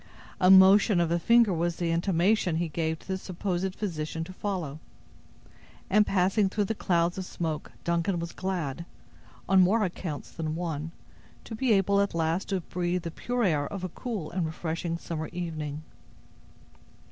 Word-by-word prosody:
A 185 - +5
motion 190 +1 +7
of 170 -1 +1
a 170 - +2
finger 230 +1 +4
was 170 0 0
the 170 -1 -1
intimation 180 +2 +2
he 170 0 -1
gave 160 0 -2
the 190 -1 -3
supposed 185 0 -3
physician 160 -5 -3
to 185 +3 -9
follow; 180 -8 -4 1.1
and 210 +1 +5
passing 195 +2 +2
through 205 +2 0
the 225 - -1
clouds 175 -3 0
of 185 - -4
smoke, 160 -4 -4
Duncad 170 +1 0
was 170 0 -4
glad, 170 -5 -3 0.6
on 190 -1 +5
more 210 +5 +4
accounts 170 -5 -4
than 155 -1 -3
one, 165 -2 -3 0.5
to - - -9
be 240 +2 0
able 200 0 +3
at 200 -3 -1
last 165 +4 0
to 190 -2 0
breathe 175 +1 -2
the 170 - -4
pure 245 +7 -2
air 150 -7 +1
of 195 -2 -6
a 185 - -2
cool 205 -5 -5
and 175 -2 -1
refreshing 165 +1 -3
summer 160 -2 -5
evening. 155 -4 -5
175 Hz, 165 wpm, -28 LUFS, 165-195 Hz, 1.1 s, motion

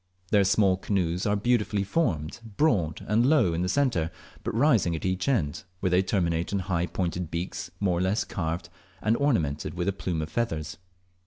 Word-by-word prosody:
Their 100 -2 +5
small 95 -1 +3
canoes 90 -2 -1
are 105 - +2
beautifully 105 -2 +1
formed, 95 - -1 0.2
broad 95 - +1
and 110 +3 +3
low 125 - +4
in 85 - -1
the 90 - 0
centre, 120 - +1 0.3
but - - -3
rising 115 - +3
at 80 - -5
each 95 +4 -1
end, 105 - 0 0.2
where 95 -1 0
they 90 +1 +5
terminate 85 -3 0
in 100 - +1
high 90 -2 -1
pointed 90 -2 -2
beaks 85 +1 -4
more 90 -4 +1
or - - 0
less 95 +4 +1
carved, 85 -1 -3 0.3
and 110 +2 +3
ornamented 85 - 0
with 90 +1 -2
a 100 - +2
plume 85 -4 -2
of 75 - -7
feathers. 80 -10 -2
95 Hz, 185 wpm, -27 LUFS, 85-105 Hz, 0.3 s, Their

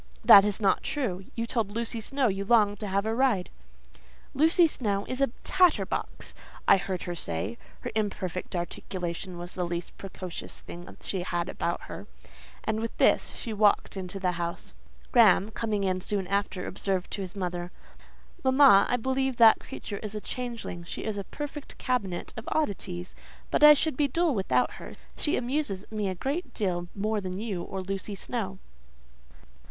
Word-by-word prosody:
"That 200 - +10
is 205 0 0
not 195 -3 +3
true. 195 -11 -2
You 230 - -1
told 230 -3 -1
Lucy 230 +1 -2
Snowe 270 +4 0
you 195 -1 -1
longed 205 -2 +3
to 210 - -4
have 200 +1 0
a 220 - 0
ride." 235 -7 +1 0.8
"Lucy 325 +4 +5
Snowe 205 -9 -1
is 255 +1 -3
a 275 - +5 0.2
tatter 365 -3 +4
box," - - -4 0.3
I - - +8
heard 185 -1 -3
her 175 - -3
say 100 - -2 0.2
(her - - -4
imperfect 190 -5 -2
articulation 175 +1 -4
was 175 +1 -7
the 180 - -2
least 170 0 -4
precocious 185 -2 -7
thing 175 +1 -10
she 190 - -2
had 175 -1 -2
about - - -2
her); - - -9 0.6
and 220 0 -1
with 230 0 -4
this; - - +3
she 230 - -4
walked 210 -1 +3
into 190 0 -5
the 185 -2 +1
house. 170 -1 -5 0.4
Graham, 220 -3 +5
coming 215 -2 -1
in 185 -1 0
soon 195 0 0
after, 200 -1 -1
observed 190 -1 -2
to 200 - -3
his 190 +1 -6
mother,—"Mamma, 195 +7 +2
I 245 - +2
believe 265 +1 0
that 225 -2 +8
creature 205 - -7
is 215 -1 -6
a - - -2
changeling: 230 -5 -5
she 170 - -6
is 210 -2 -2
a 195 - -5
perfect 295 +3 -7
cabinet 200 -9 -2
of 225 - -6
oddities; 185 - -2 0.4
but - - +2
I 300 0 +11
should 305 -2 0
be 290 - +3
dull 330 +3 +1
without 130 - +1
her: - - -9 0.2
she 295 - +1
amuses 245 -6 -1
me 210 -3 -1
a 185 - -3
great 270 - -3
deal 175 -4 -1
more 210 +1 0
than 185 -1 -4
you 205 -4 -3
or 190 +2 -5
Lucy 195 +2 -4
Snowe." 195 -2 -3
200 Hz, 175 wpm, -28 LUFS, 185-240 Hz, 0.8 s, I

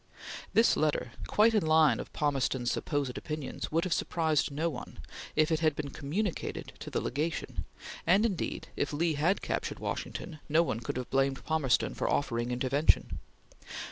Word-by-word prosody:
This 225 - +6
letter, 150 -5 0 0.2
quite 220 +2 +4
in 215 - +5
the 160 - -3
line 155 -1 +5
of - - -7
Palmerston's 135 -4 0
supposed 140 -4 -1
opinions, 150 -3 -5
would 165 +2 +2
have 185 - 0
surprised 160 -4 +1
no 150 +4 -1
one, 140 -7 -6 0.4
if 155 +1 +3
it 160 - +2
had 155 -3 +2
been 145 -2 -4
communicated 170 +9 -3
to - - -7
the - - -1
Legation; 155 +6 -2 0.4
and 195 +6 +5
indeed, 200 -6 -2
if 145 - -1
Lee 160 +2 +1
had 160 +7 +1
captured - - -2
Washington, 155 -3 -5
no 160 +3 +5
one 115 -9 -2
could 115 - -4
have 125 - -5
blamed 135 0 +1
Palmerston 155 -5 +2
for - - -1
offering 120 -3 0
intervention. 130 +5 +2
155 Hz, 170 wpm, -30 LUFS, 135-165 Hz, 0.4 s, This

